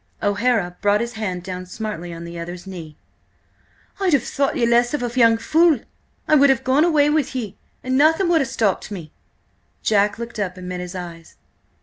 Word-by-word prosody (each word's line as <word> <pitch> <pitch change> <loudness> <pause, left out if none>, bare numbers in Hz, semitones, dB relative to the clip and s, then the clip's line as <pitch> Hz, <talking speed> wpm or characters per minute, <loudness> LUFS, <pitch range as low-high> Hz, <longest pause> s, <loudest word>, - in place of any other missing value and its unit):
O'Hara 205 -3 +1
brought 205 0 +3
his 235 +1 -3
hand 190 -6 -4
down 185 0 -6
smartly 185 -3 -5
on 165 0 -8
the 170 0 -7
other's 175 +2 -7
knee. 170 -5 -9 1.0
"I'd 380 -4 +1
have 275 -5 +3
thought 275 +2 -1
ye 240 - +2
less 240 +3 +3
of 285 - -3
a 240 0 -3
young 230 -1 +5
fool! 310 +3 +3 0.5
I - - +2
would 280 -2 +6
have 265 -1 +2
gone 265 +4 +3
away 300 -4 +3
with 300 -4 0
ye, 215 -6 -4 0.3
and 255 +1 +1
nothing 320 +5 +4
would 330 -2 +4
have 265 - -2
stopped 215 -8 0
me!" 170 -7 -8 0.7
Jack 205 -1 +2
looked 235 -1 -7
up 185 -2 -3
and 180 0 -8
met 180 0 -4
his 180 +1 -7
eyes. 170 -2 -9
220 Hz, 200 wpm, -21 LUFS, 180-265 Hz, 1.0 s, would